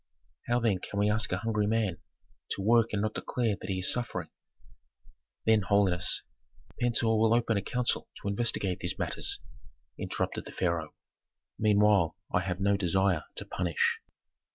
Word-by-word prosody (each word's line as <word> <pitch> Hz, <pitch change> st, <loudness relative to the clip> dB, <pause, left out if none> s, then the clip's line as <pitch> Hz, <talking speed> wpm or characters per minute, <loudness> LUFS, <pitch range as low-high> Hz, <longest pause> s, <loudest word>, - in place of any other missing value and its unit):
How, 120 Hz, 0 st, +2 dB
then, 110 Hz, -6 st, +1 dB
can 100 Hz, -, -7 dB
we 105 Hz, +1 st, +3 dB
ask 110 Hz, +1 st, +1 dB
a 90 Hz, -, +1 dB
hungry 105 Hz, -1 st, 0 dB
man 105 Hz, -7 st, 0 dB, 0.5 s
to -, -, -5 dB
work 115 Hz, +1 st, +4 dB
and 105 Hz, -1 st, -1 dB
not 110 Hz, 0 st, -1 dB
declare 115 Hz, -5 st, -1 dB
that -, -, -7 dB
he 95 Hz, -1 st, -1 dB
is 90 Hz, -, +5 dB
suffering?" 120 Hz, -1 st, -4 dB, 1.2 s
"Then, 110 Hz, -1 st, +4 dB
holiness 95 Hz, -2 st, +2 dB, 0.3 s
" 110 Hz, +4 st, -23 dB
"Pentuer 115 Hz, -2 st, +2 dB
will 110 Hz, +1 st, +4 dB
open 115 Hz, -1 st, +1 dB
a 100 Hz, -, +1 dB
council 125 Hz, +4 st, -1 dB
to -, -, -6 dB
investigate 100 Hz, -3 st, 0 dB
these -, -, -3 dB
matters," -, -, -1 dB, 0.6 s
interrupted -, -, -3 dB
the -, -, -9 dB
pharaoh. 85 Hz, -3 st, -2 dB, 0.6 s
"Meanwhile 105 Hz, -5 st, +4 dB, 0.2 s
I 90 Hz, -, +4 dB
have 90 Hz, -1 st, -3 dB
no 100 Hz, +1 st, +2 dB
desire 95 Hz, -2 st, +1 dB
to -, -, -4 dB
punish." 85 Hz, -3 st, 0 dB
105 Hz, 160 wpm, -29 LUFS, 95-115 Hz, 1.2 s, is